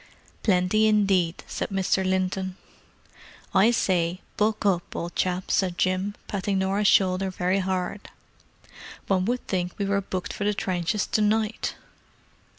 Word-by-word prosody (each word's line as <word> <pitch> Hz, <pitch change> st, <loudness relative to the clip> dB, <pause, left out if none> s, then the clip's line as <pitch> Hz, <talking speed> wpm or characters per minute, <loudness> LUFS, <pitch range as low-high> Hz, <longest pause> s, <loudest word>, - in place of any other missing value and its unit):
"Plenty 195 Hz, +2 st, +3 dB
indeed," 195 Hz, -5 st, +2 dB
said -, -, -4 dB
Mr. 190 Hz, -1 st, +1 dB
Linton. 185 Hz, 0 st, -1 dB, 1.0 s
"I 195 Hz, +4 st, +5 dB
say, 180 Hz, -6 st, +1 dB, 0.2 s
buck 215 Hz, 0 st, 0 dB
up, 180 Hz, -4 st, 0 dB
old 170 Hz, +1 st, -4 dB
chap," 180 Hz, 0 st, -1 dB
said 180 Hz, -2 st, +1 dB
Jim, 185 Hz, +2 st, 0 dB
patting 200 Hz, 0 st, -1 dB
Norah's 195 Hz, +2 st, +1 dB
shoulder 190 Hz, 0 st, +3 dB
very 185 Hz, +1 st, 0 dB
hard. 190 Hz, +1 st, -3 dB, 1.0 s
"One 185 Hz, -2 st, +1 dB
would 245 Hz, +3 st, -1 dB
think 180 Hz, -2 st, -1 dB
we 200 Hz, -, -1 dB
were 200 Hz, 0 st, +1 dB
booked 185 Hz, -1 st, -4 dB
for -, -, -4 dB
the 205 Hz, 0 st, +1 dB
trenches 185 Hz, +1 st, -1 dB
to 215 Hz, -, 0 dB
night!" 215 Hz, +1 st, 0 dB
190 Hz, 140 wpm, -25 LUFS, 185-205 Hz, 1.0 s, I